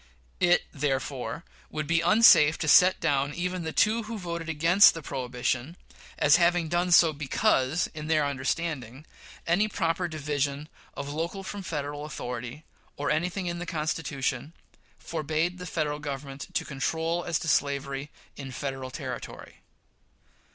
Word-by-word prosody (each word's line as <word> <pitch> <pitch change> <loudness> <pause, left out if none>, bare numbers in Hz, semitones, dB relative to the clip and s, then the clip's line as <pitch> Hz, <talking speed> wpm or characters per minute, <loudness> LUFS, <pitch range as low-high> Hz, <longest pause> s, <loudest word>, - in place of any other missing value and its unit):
It 175 -1 +4
therefore 135 -2 -3 0.2
would 155 -1 -3
be 165 +2 +2
unsafe 170 -5 +6
to 160 - -3
set 180 +5 +6
down 145 -2 0
even 180 +1 -2
the 160 -1 -4
two 220 +7 +2
who 230 - -4
voted 170 -3 -5
against 165 +6 +6
the 165 - -7
prohibition 125 +4 -3 0.4
as 145 +3 +5
having 170 -1 +2
done 175 +2 +1
so 170 -2 +6
because, 145 0 +1
in 155 -1 -6
their 155 -2 +2
understanding, 140 -1 -3 0.4
any 185 +6 +2
proper 175 -3 -1
division 145 -1 -3 0.3
of 140 0 -5
local 170 +5 -3
from 200 +1 -6
Federal 145 -4 -4
authority, 125 0 -6 0.3
or 145 - -1
anything 180 +5 -1
in 175 0 -3
the 175 - -6
Constitution, 150 -4 -2 0.4
forbade 160 +3 -2
the 180 - -6
Federal 150 -3 -2
Government 140 -1 -6
to - - 0
control 160 +5 -2
as 170 -3 0
to 165 - -6
slavery 140 -1 0 0.3
in 135 -2 -7
Federal 135 0 -5
territory. 130 -3 -8
155 Hz, 145 wpm, -27 LUFS, 140-170 Hz, 0.4 s, unsafe